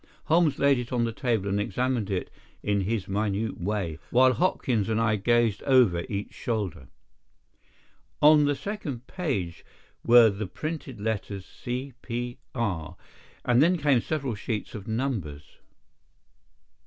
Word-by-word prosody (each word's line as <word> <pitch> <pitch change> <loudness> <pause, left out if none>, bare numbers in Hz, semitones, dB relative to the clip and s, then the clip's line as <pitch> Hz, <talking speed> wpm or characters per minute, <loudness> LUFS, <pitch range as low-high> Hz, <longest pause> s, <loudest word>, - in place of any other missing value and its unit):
Holmes 165 -2 +3
laid 140 -2 +4
it 120 -1 -6
on 120 -2 +1
the 115 - 0
table 115 -4 -1
and 100 +1 0
examined 120 -1 -1
it 95 -2 -2 0.3
in 100 -1 +1
his 100 0 -2
minute 105 0 -1
way, 90 -5 -2
while 130 +1 +5
Hopkins 125 - 0
and 110 0 +1
I 110 -1 +2
gazed 115 0 +2
over 120 -11 +4
each 100 0 -4
shoulder. 100 - -3 1.3
On 150 0 +7
the 145 0 +1
second 145 - -5
page 130 - -3 0.4
were 120 -2 +7
the 100 +1 -4
printed 150 - -6
letters 100 -2 -3
"C.P.R.," 120 - -5 0.5
and 120 +1 +4
then 175 +4 +4
came 140 -6 +3
several 140 -4 -2
sheets 105 +1 -4
of 105 -1 -8
numbers. 110 - -3
115 Hz, 130 wpm, -27 LUFS, 100-130 Hz, 1.3 s, On